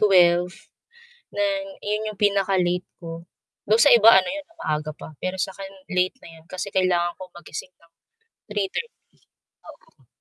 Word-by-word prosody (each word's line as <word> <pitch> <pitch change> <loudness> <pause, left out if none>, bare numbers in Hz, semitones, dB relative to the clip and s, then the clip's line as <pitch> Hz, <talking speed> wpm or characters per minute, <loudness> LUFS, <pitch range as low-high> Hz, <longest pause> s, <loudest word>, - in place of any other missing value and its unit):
12:00, 180 -3 +5 0.8
na 305 - +1 0.4
iyon 215 +1 -1
yung 210 - -12
pinaka-late 195 -3 +2
ko. 165 -1 -8 0.5
Do'n 220 +2 +5
sa 285 - +7
iba 225 0 +8
ano 185 - +1
'yon, 300 -1 -6
'no 335 - -25
maaga 155 0 -2
pa. - - -8
Pero 185 +1 -2
sa'kin 195 +1 -4 0.3
late 185 +6 +2
na - - -10
'yon 160 - -24
kasi 185 +2 -4
kailangan 175 -2 +2
kong 185 -1 -11
magising 175 +2 -8
ng 165 0 -26 0.6
3:30, 210 - -3 0.7
oo. - - -17
185 Hz, 155 wpm, -24 LUFS, 175-210 Hz, 0.8 s, iba